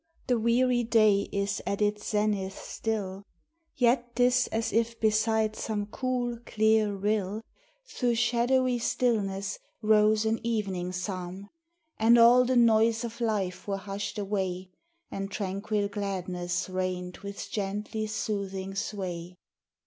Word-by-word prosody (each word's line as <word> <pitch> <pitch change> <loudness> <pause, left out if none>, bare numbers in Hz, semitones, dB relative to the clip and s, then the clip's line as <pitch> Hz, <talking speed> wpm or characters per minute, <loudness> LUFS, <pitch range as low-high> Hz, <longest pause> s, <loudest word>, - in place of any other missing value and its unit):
The 245 -3 +1
weary 240 +2 +2
day 215 -3 +3
is 200 0 -1
at 200 - -1
its 210 0 0
zenith 210 -2 0
still, 200 -3 -4 0.5
Yet 240 -1 +2
't 245 - +3
is 245 0 +3
as 225 -1 -2
if 230 +1 0
beside 220 0 +2
some 210 -2 -2
cool, 245 +1 -2
clear 220 -1 +2
rill, 205 +1 -1 0.4
Through 245 - -1
shadowy 245 +2 +2
stillness 200 -5 0 0.2
rose 215 0 +4
an 220 0 +1
evening 195 -6 -2
psalm. 185 +1 -5 0.5
And 230 +2 +6
all 240 +2 +7
the 255 +1 +1
noise 225 0 +4
of 235 0 -6
life 205 -6 -1
were 200 -1 -1
hushed 200 +1 -5
away, 190 -2 -2 0.4
And 195 0 -4
tranquil 200 +1 -2
gladness 185 -3 -3
reigned 185 -1 -3
with 200 0 -7
gently 210 +2 -3
soothing 200 -3 -3
sway. 180 -3 -4
210 Hz, 125 wpm, -28 LUFS, 195-230 Hz, 0.5 s, all